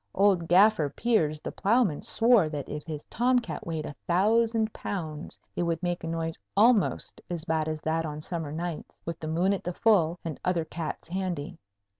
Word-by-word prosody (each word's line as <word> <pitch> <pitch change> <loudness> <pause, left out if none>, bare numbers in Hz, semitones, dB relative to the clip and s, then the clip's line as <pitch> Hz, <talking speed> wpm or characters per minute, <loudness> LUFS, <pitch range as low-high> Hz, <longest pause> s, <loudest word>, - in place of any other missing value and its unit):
Old 190 -4 +3
Gaffer 190 -3 +5
Piers 155 -4 +1
the - - -5
ploughman 200 - +2
swore 225 -8 +4
that 145 -3 -5
if 150 0 -5
his 150 -2 -5
tomcat 240 - 0
weighed 160 -2 -3
a - - -6
thousand 220 +4 +2
pounds 160 -5 -5 0.2
it - - -1
would 170 0 -1
make 175 -1 -1
a - - -3
noise 165 0 -3 0.2
almost 220 -1 +3
as 170 -2 -4
bad 160 -2 0
as 155 -1 -3
that 160 +1 0
on 150 -1 -5
summer 160 -1 -4
nights, 165 +1 -5
with 165 -1 -4
the 155 - -5
moon 175 +5 +2
at 195 - -3
the 180 - -3
full 180 -7 +3
and 160 -4 -4
other 175 -3 +1
cats 160 0 -5
handy. 180 -3 -3
170 Hz, 185 wpm, -28 LUFS, 160-200 Hz, 0.2 s, Gaffer